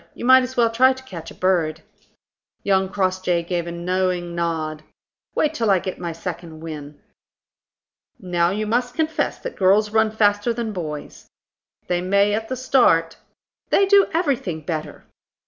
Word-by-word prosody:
You -, -, -6 dB
might 260 Hz, +1 st, +7 dB
as 255 Hz, 0 st, -5 dB
well 230 Hz, -1 st, +3 dB
try 260 Hz, +3 st, +5 dB
to 260 Hz, 0 st, -13 dB
catch 175 Hz, -11 st, -9 dB
a -, -, -13 dB
bird." 165 Hz, -4 st, 0 dB, 0.8 s
Young 190 Hz, -1 st, +2 dB
Crossjay 185 Hz, -3 st, 0 dB
gave 175 Hz, 0 st, -3 dB
a -, -, -4 dB
knowing 180 Hz, 0 st, -1 dB
nod. 160 Hz, -2 st, -2 dB, 0.5 s
"Wait 305 Hz, 0 st, +1 dB
till 230 Hz, -8 st, 0 dB
I 195 Hz, -, +5 dB
get 185 Hz, +1 st, -5 dB
my 170 Hz, -1 st, -4 dB
second 165 Hz, -1 st, -7 dB
wind." 150 Hz, -3 st, -8 dB, 1.2 s
"Now 175 Hz, -4 st, +1 dB
you 210 Hz, +3 st, -2 dB
must 245 Hz, +3 st, -1 dB
confess 320 Hz, 0 st, -1 dB
that -, -, -7 dB
girls 205 Hz, +2 st, +3 dB
run 220 Hz, 0 st, +3 dB
faster 210 Hz, +1 st, +2 dB
than 225 Hz, -2 st, -3 dB
boys." 155 Hz, -5 st, -7 dB, 0.6 s
"They 175 Hz, -1 st, -1 dB
may 200 Hz, +3 st, +2 dB
at 220 Hz, +1 st, -2 dB
the 260 Hz, -, -2 dB
start." 200 Hz, -11 st, +2 dB, 0.5 s
"They 395 Hz, -, +4 dB
do 395 Hz, 0 st, +5 dB
everything 270 Hz, -, -1 dB
better." 155 Hz, -1 st, -5 dB
190 Hz, 160 wpm, -22 LUFS, 170-230 Hz, 1.2 s, might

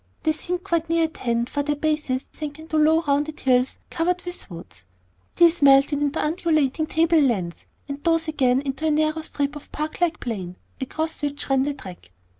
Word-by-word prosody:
They 315 Hz, -, +3 dB
seemed 355 Hz, +3 st, -3 dB
quite 335 Hz, -4 st, -1 dB
near 330 Hz, 0 st, +3 dB
at 320 Hz, -1 st, -3 dB
hand, 235 Hz, -1 st, 0 dB
for 290 Hz, -, -2 dB
their 295 Hz, +1 st, -1 dB
bases 295 Hz, -3 st, -1 dB
sank 295 Hz, -1 st, -6 dB
into 315 Hz, 0 st, -6 dB
low 310 Hz, +1 st, +4 dB
rounded 295 Hz, 0 st, 0 dB
hills 255 Hz, -1 st, +2 dB
covered 360 Hz, +2 st, 0 dB
with 355 Hz, -8 st, -5 dB
woods, 165 Hz, -, -10 dB, 0.5 s
these 340 Hz, -1 st, +5 dB
melted 280 Hz, +1 st, +5 dB
into 290 Hz, +1 st, 0 dB
undulating 310 Hz, -2 st, +1 dB
table 330 Hz, 0 st, +3 dB
lands, 195 Hz, -11 st, -1 dB, 0.2 s
and 280 Hz, 0 st, -6 dB
those 330 Hz, -1 st, +2 dB
again 265 Hz, -4 st, +2 dB
into 280 Hz, +3 st, -2 dB
a -, -, +3 dB
narrow 310 Hz, +1 st, +1 dB
strip 290 Hz, -2 st, -2 dB
of 295 Hz, -, -11 dB
park 305 Hz, +3 st, -4 dB
like 335 Hz, -2 st, +1 dB
plain 190 Hz, -7 st, -5 dB, 0.3 s
across 315 Hz, +5 st, -3 dB
which 285 Hz, -1 st, -3 dB
ran 270 Hz, -1 st, +4 dB
the 285 Hz, +1 st, -1 dB
track. 180 Hz, -, -11 dB
300 Hz, 190 wpm, -23 LUFS, 270-320 Hz, 0.5 s, these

